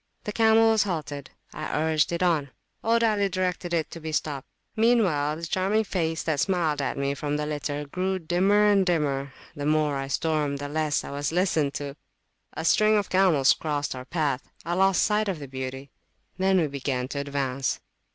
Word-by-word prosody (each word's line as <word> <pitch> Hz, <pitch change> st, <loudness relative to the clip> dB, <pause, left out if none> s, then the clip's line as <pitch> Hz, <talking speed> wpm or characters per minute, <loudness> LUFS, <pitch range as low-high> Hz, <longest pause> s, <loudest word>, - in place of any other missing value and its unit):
The 210 Hz, -, -3 dB
camel 225 Hz, +1 st, +5 dB
was 220 Hz, -1 st, +3 dB
halted. 150 Hz, -7 st, -3 dB, 0.2 s
I 155 Hz, -1 st, -3 dB
urged 155 Hz, 0 st, +2 dB
it 170 Hz, +1 st, -1 dB
on: 160 Hz, -6 st, +1 dB, 0.3 s
old 230 Hz, +1 st, +3 dB
Ali 210 Hz, -3 st, +2 dB
directed 180 Hz, -1 st, -2 dB
it 165 Hz, -2 st, -1 dB
to 170 Hz, -, -7 dB
be 160 Hz, 0 st, -5 dB
stopped. 145 Hz, -3 st, -2 dB, 0.3 s
Meanwhile 195 Hz, -11 st, +2 dB
the 165 Hz, +1 st, -6 dB
charming 195 Hz, +6 st, +1 dB
face 165 Hz, -5 st, -2 dB
that 155 Hz, -3 st, -1 dB
smiled 165 Hz, -6 st, +1 dB
at 135 Hz, +1 st, -2 dB
me 140 Hz, 0 st, 0 dB
from 145 Hz, +1 st, -2 dB
the 150 Hz, -, -2 dB
litter 145 Hz, -1 st, -3 dB
grew 185 Hz, +6 st, -2 dB
dimmer 185 Hz, +5 st, +2 dB
and 205 Hz, -2 st, +4 dB
dimmer; 145 Hz, -6 st, 0 dB, 0.2 s
the 145 Hz, -1 st, -3 dB
more 150 Hz, -2 st, +2 dB
I 135 Hz, 0 st, -3 dB
stormed, 150 Hz, -1 st, 0 dB
the 145 Hz, 0 st, -5 dB
less 155 Hz, -1 st, 0 dB
I -, -, -7 dB
was 145 Hz, +1 st, -2 dB
listened 165 Hz, -5 st, +1 dB
toa 140 Hz, -1 st, -5 dB, 0.7 s
string 215 Hz, +5 st, +4 dB
of 205 Hz, -, -1 dB
camels 180 Hz, -8 st, +4 dB
crossed 145 Hz, -2 st, -2 dB
our 130 Hz, 0 st, -8 dB
pathI 145 Hz, -3 st, -2 dB, 0.3 s
lost 190 Hz, 0 st, +3 dB
sight 215 Hz, 0 st, +1 dB
of 190 Hz, -4 st, -1 dB
the 145 Hz, -2 st, -8 dB
beauty. 130 Hz, 0 st, -6 dB, 0.4 s
Then 190 Hz, 0 st, +3 dB
we 165 Hz, -, +2 dB
began 135 Hz, -3 st, -2 dB
to 140 Hz, -, -3 dB
advance. 140 Hz, -2 st, -2 dB
155 Hz, 185 wpm, -26 LUFS, 145-190 Hz, 0.7 s, camel